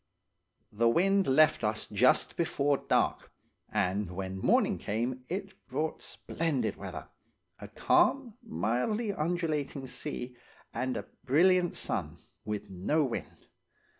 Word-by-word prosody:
"The 115 +2 +3
wind 195 +8 +3
left 145 -1 +4
us 105 0 0
just 105 +5 +3
before 145 -4 +1
dark, - - 0 0.4
and 95 +1 0
when 95 +1 -5
morning - - +3
came 120 +4 -2
it 195 +1 -4
brought 155 0 -2
splendid 165 -5 -2
weather–a - - -11
calm, 265 -5 +2
mildly 210 - -1
undulating 155 -5 -2
sea, 125 -1 -5 0.4
and 130 +2 -2
a - - -5 0.2
brilliant 175 +6 +4
sun, - - -3 0.3
with 105 -1 -4
no 100 - 0
wind. 130 -4 -5
135 Hz, 110 wpm, -30 LUFS, 110-175 Hz, 0.4 s, left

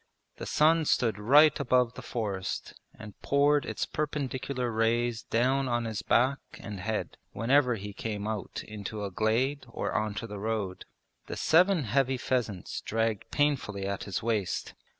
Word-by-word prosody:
The - - -6
sun 160 +1 +4
stood 115 -7 +1
right 145 +9 +6
above 125 -3 +2
the - - -8
forest 100 -5 -3 0.2
and 105 -2 -11
poured 145 +1 +3
its - - -2
perpendicular 130 -4 -2
rays 115 +1 +1
down 130 +5 +1
on 120 -1 0
his 110 -2 -3
back 130 +4 +2 0.2
and 105 -2 -7
head 110 +3 -3 0.2
whenever 125 +1 +3
he 100 -1 -7
came 105 0 -4
out 110 -2 -4
into 105 0 -6
a 100 - -5
glade 115 +7 +1
or - - -3
onto 105 +1 -1
the 105 -2 -7
road. 105 -3 -3 0.4
The - - -5
seven 180 0 +4
heavy 130 +3 +1
pheasants 120 -7 -2
dragged 110 -1 -1
painfully 130 -9 0
at 100 0 -3
his 100 0 -3
waist. 110 -5 -1
115 Hz, 150 wpm, -29 LUFS, 105-135 Hz, 0.4 s, right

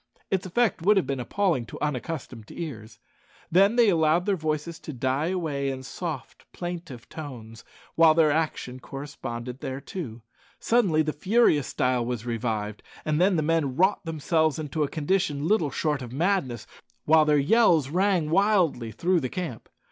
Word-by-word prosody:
Its 190 -1 0
effect 220 0 +1
would 205 +4 +4
have 190 - +2
been 135 -1 -3
appalling 170 - 0
to 115 - -10
unaccustomed 130 -5 -4
ears. 115 -10 -7 0.5
Then 195 +6 +5
they 235 -3 +5
allowed 165 0 +3
their 200 -1 +2
voices 155 0 -3
to 155 - -8
die 130 +4 -1
away 155 -7 -1
in 130 -1 -5
soft, - - -7
plaintive 170 -8 -6
tones, 115 -7 -9 0.3
while 160 -1 +6
their 160 -2 +4
action 145 -5 -2
corresponded 130 -2 -7
thereto. 135 -3 -6 0.4
Suddenly 195 -10 +2
the 155 0 -2
furious 185 - +3
style 125 -1 0
was 120 -1 -4
revived, 110 -3 -3 0.2
and 155 +1 +1
the 185 - +5
men 150 -4 0
wrought 190 +7 +2
themselves 160 -1 0
into 155 -1 -3
a 150 - +2
condition 155 -2 0
little 180 -7 +2
short 150 -1 -1
of 120 -2 -7
madness, 140 - 0 0.4
while 155 0 +6
their 150 -1 +4
yells 160 - +4
rang 180 -3 +1
wildly 180 - +2
through 175 - +1
the 130 -4 -3
camp. 165 -10 -6
155 Hz, 155 wpm, -26 LUFS, 130-175 Hz, 0.5 s, while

